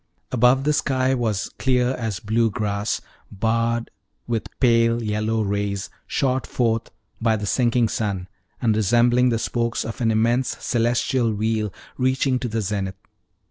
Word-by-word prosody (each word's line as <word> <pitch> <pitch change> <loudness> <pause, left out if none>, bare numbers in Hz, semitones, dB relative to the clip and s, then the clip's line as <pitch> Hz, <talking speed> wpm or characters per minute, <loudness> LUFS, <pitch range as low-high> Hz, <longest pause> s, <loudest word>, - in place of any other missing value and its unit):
Above, 125 +2 +4
the 150 +1 +2
sky 130 -2 +1
was 110 -5 -1
clear 125 -2 +2
as 115 -8 -3
blue 115 +4 +1
glass, 100 0 -2 0.3
barred 115 +3 0 0.3
with 115 -2 -2
pale 115 -2 +3
yellow 110 +1 0
rays, 100 -1 -2 0.2
shot 130 -1 0
forth 115 -2 0 0.3
by 115 -1 +3
the 105 -1 -3
sinking 120 +2 +2
sun, 100 -4 -2 0.3
and 115 -4 +2
resembling 120 +4 +3
the 115 - +1
spokes 115 +1 -1
of 115 +3 -6
an 115 - +2
immense 115 +3 +1
celestial 120 0 +1
wheel 110 0 -1 0.3
reaching 130 0 +2
to 125 - -3
the 115 -1 -2
zenith. 95 -1 -2
115 Hz, 140 wpm, -23 LUFS, 110-125 Hz, 0.3 s, Above